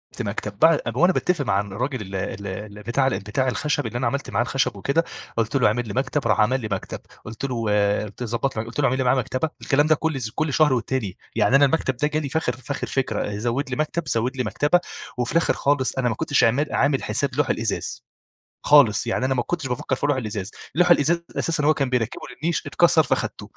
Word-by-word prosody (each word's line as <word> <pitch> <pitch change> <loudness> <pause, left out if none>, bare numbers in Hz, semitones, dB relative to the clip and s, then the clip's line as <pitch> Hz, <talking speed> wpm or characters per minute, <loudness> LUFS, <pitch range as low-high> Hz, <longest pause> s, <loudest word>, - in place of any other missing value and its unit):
ت - - -4
مكتب، 105 -1 -4
بعد 160 -2 +5
وأنا 180 +2 +4
باتفق 175 -6 0
مع 100 -3 +2
الراجل 120 +6 -4
ال 95 -1 -7
ال 95 +1 -4
ال 105 +2 -7
بتاع 130 +4 +1
ال 135 - 0
بتاع 120 +6 -1
الخشب 145 +2 -1
اللي 120 - -4
أنا 130 - 0
عملت 140 0 -3
معاه - - +1
الخشب 130 -3 -1
وكده، 140 - +1 0.3
قلت 115 +3 0
له: 135 - +4
"اعمل 115 +2 0
لي 100 - -5
مكتب." 130 +1 -1
راح 105 - +2
عمل 130 +4 +2
لي 110 - -4
مكتب، 95 - -4 0.3
قلت 110 +4 -6
له 125 -4 -2 0.4
قلت 105 +3 -12
له 120 - -2
ضبط 120 +4 -1
قلت 115 +4 -5
له: 145 - +3
"اعمل 130 +1 +2
لي 130 - 0
معاه 125 +1 +3
مكتبة." 130 +5 -1
الكلام 145 +2 +2
ده 155 - +5
كل 160 -2 -2 0.2
كل 155 -2 -1
شهر 150 -4 +4
والتاني 120 -5 -2 0.2
يعني 110 +3 +3
أنا 140 +1 +7
المكتب 135 -2 0
ده 150 - +1
جالي 150 -1 -2
في 160 - -1
اخر 125 -6 0
في 130 +2 -8
آخر 140 - -3
فكرة 105 -6 -2
زود 120 +5 -2
لي 125 - -2
مكتب، 155 +2 -2
زود 125 +2 0
لي 125 - 0
مكتبة، 150 +7 +2 0.4
وفي 125 -1 0
الآخر 165 0 +2
خالص 140 -2 0
أنا 125 -2 +1
ما 110 - -2
كنتش 145 +1 +1
عمال 125 +6 +2
عامل 140 -2 +2
حساب 135 -3 -1
لوح 150 -1 +1
الإزاز، 110 -2 -2 0.6
خالص، 140 -8 +5
يعني 130 - 0
أنا 135 - +1
ما 125 - 0
كنتش 160 0 -3
بافكر 125 +1 -2
في 135 - -3
لوح 145 -2 +2
الإزاز، 105 -5 -4 0.2
لوح 175 +1 +4
الإزاز 170 +1 +4 0.2
أساسًا 165 -3 0
هو 155 - +5
كان 140 -3 -1
بيركبه 125 -3 -1 0.2
للنيش 165 +2 -1
اتكسر 170 -2 +4
فأخدته. - - -2
130 Hz, 230 wpm, -23 LUFS, 115-145 Hz, 0.6 s, أنا